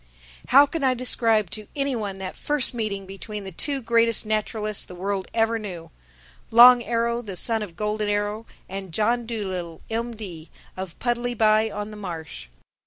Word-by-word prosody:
How 280 +3 +7
can 290 +1 -4
I 260 -1 +3
describe 225 -5 +1
to 215 -2 -6
any 275 -2 0
one 205 -4 -4
that 190 -1 -6
first 295 -4 +3
meeting 210 -4 -3
between 200 +2 -7
the 190 - -7
two 275 - -2
greatest 230 0 +3
naturalists 215 0 -2
the 180 - -11
world 195 +1 -3
ever 225 0 +1
knew, 175 -6 -7 0.6
Long 245 +2 +9
Arrow, 235 +1 0
the 200 -6 -7
son 225 +4 +1
of 190 -6 -7
Golden 210 +1 -1
Arrow 205 +2 -1 0.2
and 190 -2 -6
John 235 +2 +1
Dolittle, 185 -7 -4
M.D., 220 -8 -5 0.3
of 185 -2 -7
Puddleby 235 -3 +2
on 210 0 -5
the 210 - -9
Marsh? 160 - -7
215 Hz, 165 wpm, -24 LUFS, 195-235 Hz, 0.6 s, Long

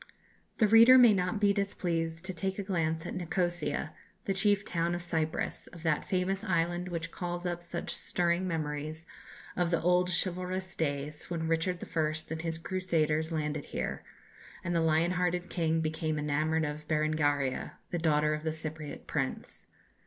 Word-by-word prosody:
The 215 - +4
reader 230 +4 +9
may 240 -4 +8
not 185 +2 0
be 205 -1 +4
displeased 170 -4 -2
to 190 - -3
take 190 +3 -2
a 200 - -2
glance 165 -4 -1
at - - -4
Nikosia, 175 -4 -1 0.3
the 195 - +1
chief 205 +1 +2
town 170 0 0
of 175 - -5
Cyprus 160 -2 -2
of 170 -2 -12
that 160 -3 0
famous 190 +1 0
island 175 0 0
which 170 -1 -4
calls 175 0 -4
up 175 -1 -2
such 175 0 -3
stirring 175 +1 0
memories 155 -1 -3 0.5
of 175 -1 +1
the 170 -2 +2
old 180 +1 +3
chivalrous 185 +1 -1
days 145 -1 -2
when 165 -2 -2
Richard 165 +2 0
I. 155 -2 0 0.2
and 160 0 -3
his 165 -1 -2
Crusaders 165 -3 0
landed 150 -2 -2
here, - - -4 0.6
and 175 0 -1
the 165 - +3
lion 160 +2 +3
hearted 180 0 0
king 165 -2 +1
became 155 0 -1
enamoured 155 +2 +1
of 150 +1 -5
Berengaria, 150 -3 +1 0.2
the 175 - -1
daughter 150 -1 +2
of 150 - -3
the 160 0 -1
Cypriot 155 -1 -6
prince. - - -3
170 Hz, 165 wpm, -31 LUFS, 155-180 Hz, 0.6 s, reader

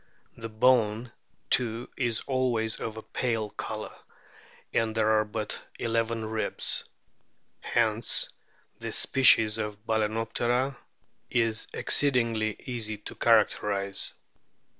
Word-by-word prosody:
The 115 0 -7
"bone" 115 0 +2 0.4
too 120 -1 +2
is 120 -4 -1
always 125 -5 0
of 110 0 -5
a 110 - -7
pale 115 -4 -2
colour, - - -6 0.8
and 115 -1 0
there 110 -1 +2
are 110 0 +4
but 105 0 -4 0.2
eleven 115 -1 -1
ribs. 110 0 0 0.8
Hence 115 -1 +1 0.5
this - - -1
species 115 -5 +5
of 105 0 -5
Bal&noptera 115 +4 0 0.5
is 115 -2 0
exceedingly 115 -6 +1
easy 110 -4 -4
to 105 - -9
characterise. 105 -3 +2
115 Hz, 100 wpm, -28 LUFS, 110-120 Hz, 0.8 s, species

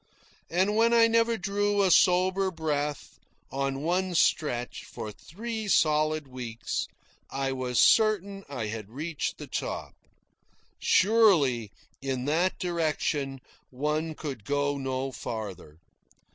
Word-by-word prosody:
And 190 +5 +1
when 230 +1 +4
I 230 -1 +7
never 230 0 +2
drew 205 +1 +1
a 190 - +3
sober 185 +2 +4
breath, 150 -4 -3 0.3
on 135 0 -2
one 180 +2 0
stretch, 125 -7 +1
for 110 - -7
three 220 - -6
solid 155 -4 +2
weeks, 120 -3 -4 0.4
I 135 0 -2
was 130 -2 -2
certain 200 -3 +3
I 125 -6 -3
had 105 -1 -5
reached 150 +6 -4
the - - -7
top. - - -4 0.9
Surely, 180 - +4 0.3
in 130 -2 -2
that 170 +6 +1
direction, 155 -5 -1 0.3
one 150 +4 -2
could 135 -9 -6
go 145 +3 0
no 135 0 -2
farther. 100 -11 -6
155 Hz, 115 wpm, -28 LUFS, 135-190 Hz, 0.9 s, I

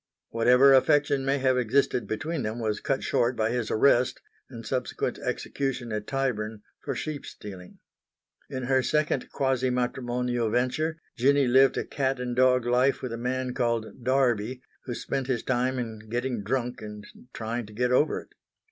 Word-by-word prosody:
Whatever 125 +4 +5
affection 140 0 +3
may 135 +1 +1
have 130 -1 +2
existed 125 0 +1
between 155 +8 -3
them 110 0 -3
was 110 -3 -1
cut 135 - -1
short 120 +2 +1
by 110 0 0
his 120 -2 -1
arrest 125 +2 +3 0.3
and 115 -3 -9
subsequent 130 +1 -2
execution 135 -4 -3
at 105 0 -3
Tyburn 110 -6 -2 0.2
for - - -3
sheepstealing. 105 - -7 0.7
In 130 -2 -4
her 130 +1 +2
second 150 0 0
quasi 130 -2 0
matrimonial 125 -1 -1
venture 130 +7 0 0.2
Jinny 140 +3 +3
lived 130 +2 +5
a - - -1
cat 135 -2 -1
and 125 -1 -3
dog 125 -1 +4
life 125 +3 +2
with 125 -3 -3
a - - -2
man 125 +2 -2
called 115 -1 -2
Darby 125 -2 +1 0.2
who 120 - -4
spent 135 +1 -3
his 125 -3 -1
time 130 +1 0
in 110 -3 -6
getting 120 -1 -2
drunk 125 +3 -2
and 105 -1 -8 0.3
trying 115 0 -4
to 105 - -13
get 125 +3 0
over 145 +5 +2
it. - - -20
125 Hz, 165 wpm, -27 LUFS, 115-135 Hz, 0.7 s, Whatever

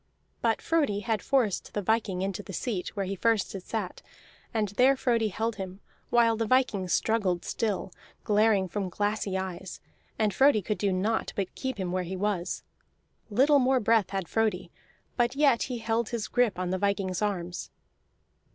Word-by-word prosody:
But - - +1
Frodi 285 -12 +1
had 220 -1 -1
forced 245 -8 0
the 205 - 0
viking 195 -3 0
into 195 +1 -2
the 195 - -10
seat 200 -2 -3
where 200 -2 -1
first 225 +1 +1
he - - -5
had 185 - -10
sat; 210 -4 -4 0.5
and 215 -3 0
there 250 +7 +4
Frodi 230 -4 +2
held 225 +2 -2
him, 190 -1 -6 0.3
while 230 -1 +4
the 225 0 -1
viking 235 -7 +2
struggled 190 -2 +1
still, 210 -4 -2 0.3
glaring 210 -2 +3
from 190 +1 -3
glassy 205 0 -1
eyes, 190 -1 -5 0.4
and 215 -2 +1
Frodi 265 -7 +4
could 210 0 -2
do 200 0 +1
naught 205 +5 0
but 195 -2 -2
keep 260 -3 -4
him 185 -3 -2
where 185 0 0
he 180 +1 -4
was. 195 -3 -2 0.7
Little 280 +7 +5
more 260 0 +3
breath 225 -3 +3
had 195 -3 -3
Frodi, 190 -5 0 0.5
but 240 +1 +2
yet 275 -5 +4
he 250 - -2
held 225 0 -1
his 235 -3 -3
grip 245 -6 +1
on 180 0 -2
the 185 - -1
viking's 195 -2 0
arms. 180 -4 -2
210 Hz, 175 wpm, -28 LUFS, 190-230 Hz, 0.7 s, Little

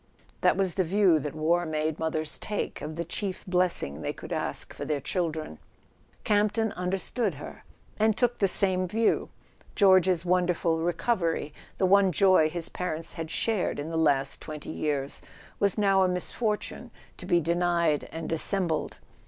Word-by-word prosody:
That - - +3
was 190 -3 0
the 190 - +1
view 180 -2 +3
that 150 +1 -5
war 165 +3 +2
made 155 -1 -2
mothers 155 -1 -3
take 210 - -3
of 155 +1 -5
the 170 +1 -3
chief 185 +3 -4
bless¬ 180 -1 +1
ing 70 +3 -6
they - - -2
could - - -7
ask - - -3
for - - -7
their 150 -2 -1
children! 155 - -3 0.6
Campton 215 +1 +2
under¬ 180 +2 -1
stood 215 - -2
her, 145 - -10 0.4
and 220 0 +3
took 245 -1 +1
the 195 - +4
same 185 -1 +3
view. 225 +5 +1 0.5
George's 185 -3 +4
wonderful 175 -2 +1
recovery, 165 -2 -1 0.2
the 190 - +2
one 195 0 +5
joy 185 -2 +4
his 165 0 -3
parents 165 -2 -4
had 165 -1 -5
shared 215 +2 0
in 150 +3 -5
the - - -3
last 140 -4 +1
twenty 155 -1 -7
years, 145 -2 -2 0.4
was 200 0 +2
now 195 -2 +3
a 185 - +4
misfortune 210 +4 -3 0.3
to 180 - -9
be 175 -2 +4
denied 170 -2 +1
and 165 -1 -5
dissembled. 165 0 0
175 Hz, 165 wpm, -27 LUFS, 155-195 Hz, 0.6 s, one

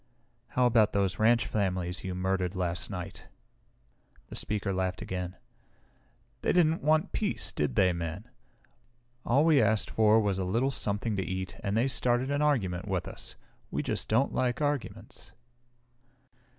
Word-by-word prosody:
"How 125 - +5
about 115 -3 +4
those 100 -2 0
ranch 115 +2 +4
families 90 -3 -1
you 95 -1 -4
murdered 95 0 -1
last 85 -2 -1
night?" 90 -4 -7 1.0
The - - -8
speaker 105 -2 -2
laughed 95 -1 -1
again. 90 0 -4 1.1
"They - - +1
didn't 165 -2 +3
want 155 +2 +2
peace, 210 -2 -1
did 75 -4 -1
they, 90 -2 +4
Men? 85 +6 -5 1.0
All 140 +6 +3
we 155 -4 +5
asked 110 -2 +1
for 110 0 +4
was 100 -3 0
a - - 0
little 115 +9 +1
something 105 -2 -1
to 95 - 0
eat 95 0 -4
and 100 +1 0
they 120 +4 +3
started 125 0 +1
an 145 +1 0
argument 105 -12 0
with 95 -3 -2
us. - - -5 0.3
We - - -2
just - - -2
don't 120 +6 +2
like 125 -1 0
arguments." 145 -7 -4
105 Hz, 150 wpm, -29 LUFS, 95-125 Hz, 1.1 s, How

